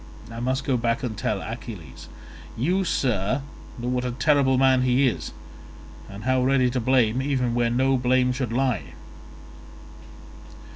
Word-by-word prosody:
I 115 - -7
must 130 +3 -1
go 135 -2 +1
back 115 +3 -1
and 115 -4 -3
tell 105 -1 -2
Achilles. 110 - -8 0.5
You, 180 +11 +1
sir, 125 - 0 0.3
know 120 0 -5
what 125 0 -1
a 125 - -2
terrible 130 +1 +2
man 130 -1 +4
he 130 +2 +3
is, 120 - -3 0.8
and 100 +1 -9
how 130 +1 +2
ready 130 -1 +2
to 125 - -1
blame 125 -1 +2
even 130 -3 0
where 120 0 +1
no 130 +3 +2
blame 125 0 +2
should 125 -3 -3
lie." 125 -3 -1
125 Hz, 150 wpm, -24 LUFS, 115-130 Hz, 0.8 s, man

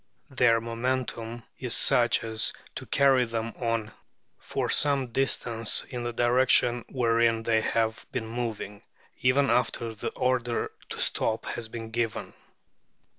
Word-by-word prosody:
Their 120 -3 +4
momentum 115 0 -3 0.2
is - - -1
such - - +4
as 110 -1 0 0.2
to - - -7
carry 135 -2 +4
them 115 -1 -3
on 115 -3 -2 0.5
for - - -3
some 140 -4 +2
distance 115 -3 +1
in 125 - -5
the 120 0 -3
direction 120 0 +3
wherein 115 -2 +2
they 110 -1 +2
have 110 0 -1
been 110 - -3
moving, 110 -3 -5 0.4
even 135 +2 +3
after 115 -2 0
the 105 - -4
order 125 -2 -1 0.2
to - - -6
stop 110 0 -1
has 115 -2 -5
been 115 -1 -7
given. 115 -1 -2
115 Hz, 130 wpm, -27 LUFS, 115-125 Hz, 0.5 s, Their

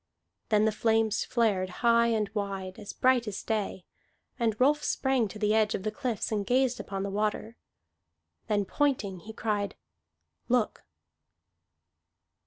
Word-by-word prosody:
Then 215 0 +4
the 220 - +3
flames 220 0 +1
flared 205 -6 +1 0.2
high 235 0 +5
and 220 -2 +1
wide, 195 -2 -4
as 205 - -7
bright 255 -2 +2
as 205 - -4
day. 210 -4 -2 0.5
And 225 -3 0
Rolf 295 +3 +3
sprang 265 -4 +1
to 195 - -9
the 210 0 +1
edge 220 -1 +3
of 190 - -5
the 215 - -1
cliffs 240 -3 -3
and 210 -2 0
gazed 250 +2 +2
upon 195 -1 -4
the 200 - -3
water. 215 +2 -2 0.9
Then, 205 -3 +1
pointing, 220 -7 0
he 215 +6 -10
cried, 210 -2 -2 0.7
"Look!" 245 -3 +1
215 Hz, 145 wpm, -29 LUFS, 205-235 Hz, 0.9 s, high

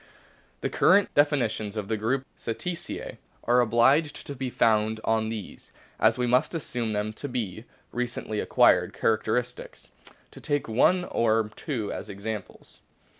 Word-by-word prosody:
The - - -1
current 200 0 +4
definitions 120 -8 +1
of 105 -2 -3
the 110 - 0
group 125 +5 -1
Cetacea 170 +9 -5 0.2
are 120 +1 +3
obliged 130 +7 +2
to 145 - -6
be 130 0 -3
founded 110 -2 +2
on 110 0 +1
these, 110 -4 -8 0.3
as 110 +2 +4
we 125 - 0
must 125 +7 +2
assume 120 -8 -2
them 105 +1 -2
to 145 +6 -6
be, 110 -3 -4 0.3
recently 120 -3 -3
acquired - - +3
characters. 115 +2 0 0.8
To - - -13
take 145 -1 -1
one 180 +11 +3
or 110 -5 +1
two 120 -9 -3
as - - -7
examples. 105 +2 -7
115 Hz, 140 wpm, -26 LUFS, 110-130 Hz, 0.8 s, current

